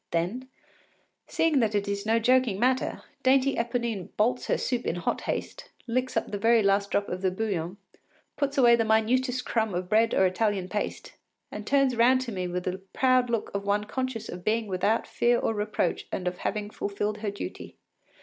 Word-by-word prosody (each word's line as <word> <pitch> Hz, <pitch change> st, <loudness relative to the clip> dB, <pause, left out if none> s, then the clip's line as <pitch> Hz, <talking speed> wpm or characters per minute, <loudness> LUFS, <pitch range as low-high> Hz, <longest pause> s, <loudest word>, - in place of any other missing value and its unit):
Then 190 Hz, +11 st, -2 dB, 0.8 s
seeing 320 Hz, -4 st, +2 dB
that 220 Hz, -3 st, +1 dB
it 200 Hz, -1 st, 0 dB
is 200 Hz, +1 st, -3 dB
no 225 Hz, +1 st, +3 dB
joking 245 Hz, -3 st, +2 dB
matter, 255 Hz, +2 st, 0 dB, 0.2 s
dainty 270 Hz, +1 st, +3 dB
Eponine 235 Hz, -4 st, -2 dB
bolts 235 Hz, +4 st, +1 dB
her -, -, +2 dB
soup 245 Hz, -2 st, -2 dB
in -, -, 0 dB
hot 175 Hz, -, -2 dB
haste, -, -, -4 dB, 0.2 s
licks 255 Hz, +2 st, -1 dB
up -, -, -1 dB
the 205 Hz, -, -3 dB
very 225 Hz, +1 st, +4 dB
last 200 Hz, 0 st, +2 dB
drop 200 Hz, -, 0 dB
of 180 Hz, +1 st, -4 dB
the 190 Hz, -, +2 dB
bouillon, 185 Hz, -2 st, -3 dB, 0.6 s
puts 280 Hz, 0 st, -2 dB
away 240 Hz, -3 st, +7 dB
the 230 Hz, -, +1 dB
minutest 250 Hz, +4 st, +1 dB
crumb 220 Hz, -5 st, 0 dB
of 180 Hz, 0 st, -3 dB
bread 225 Hz, +2 st, +3 dB
or 190 Hz, -, +4 dB
Italian 190 Hz, 0 st, 0 dB
paste, 210 Hz, +2 st, -4 dB, 0.4 s
and 210 Hz, 0 st, -7 dB
turns 275 Hz, -2 st, +3 dB
round 250 Hz, +3 st, +4 dB
to 250 Hz, -2 st, -4 dB
me 185 Hz, -3 st, -3 dB
with 180 Hz, 0 st, -3 dB
the 185 Hz, +1 st, -3 dB
proud 255 Hz, -1 st, +3 dB
look 230 Hz, -2 st, -2 dB
of 200 Hz, 0 st, -2 dB
one 205 Hz, +1 st, +1 dB
conscious 255 Hz, +1 st, -4 dB
of 175 Hz, 0 st, -8 dB
being 220 Hz, +2 st, +1 dB
without 205 Hz, +3 st, 0 dB
fear 240 Hz, 0 st, +2 dB
or 225 Hz, -, 0 dB
reproach 210 Hz, 0 st, -1 dB
and 180 Hz, -, -3 dB
of 180 Hz, 0 st, -3 dB
having 210 Hz, 0 st, -3 dB
fulfilled 205 Hz, +1 st, -3 dB
her 210 Hz, -1 st, -2 dB
duty. 200 Hz, -, -7 dB
220 Hz, 195 wpm, -27 LUFS, 200-245 Hz, 0.8 s, away